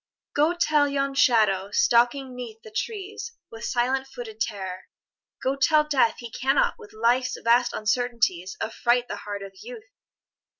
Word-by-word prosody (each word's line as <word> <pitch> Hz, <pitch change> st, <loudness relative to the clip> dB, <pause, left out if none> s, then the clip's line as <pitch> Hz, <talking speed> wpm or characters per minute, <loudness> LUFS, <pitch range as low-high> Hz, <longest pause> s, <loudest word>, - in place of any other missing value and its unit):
Go 310 Hz, +4 st, +2 dB
tell 300 Hz, -4 st, +3 dB
yon 275 Hz, 0 st, -1 dB
shadow 215 Hz, -8 st, +3 dB
stalking 245 Hz, +5 st, +2 dB
'neath 230 Hz, -3 st, -8 dB
the 220 Hz, -, -12 dB
trees 425 Hz, -, -5 dB, 0.2 s
With 225 Hz, 0 st, -9 dB
silent 260 Hz, +2 st, 0 dB
footed 235 Hz, -4 st, -9 dB
terror, 190 Hz, -4 st, -3 dB, 0.6 s
go 265 Hz, +1 st, +1 dB
tell 300 Hz, +2 st, +4 dB
Death 275 Hz, -7 st, +2 dB
He 235 Hz, -2 st, -9 dB
cannot 270 Hz, +5 st, +2 dB
with 205 Hz, -, -13 dB
Life's 245 Hz, +3 st, +1 dB
vast 240 Hz, +1 st, +3 dB
uncertainties 215 Hz, -5 st, 0 dB
Affright 240 Hz, +2 st, +1 dB
the -, -, -5 dB
heart 205 Hz, -1 st, -6 dB
of 195 Hz, 0 st, -9 dB
Youth -, -, -10 dB
245 Hz, 145 wpm, -25 LUFS, 220-275 Hz, 0.6 s, tell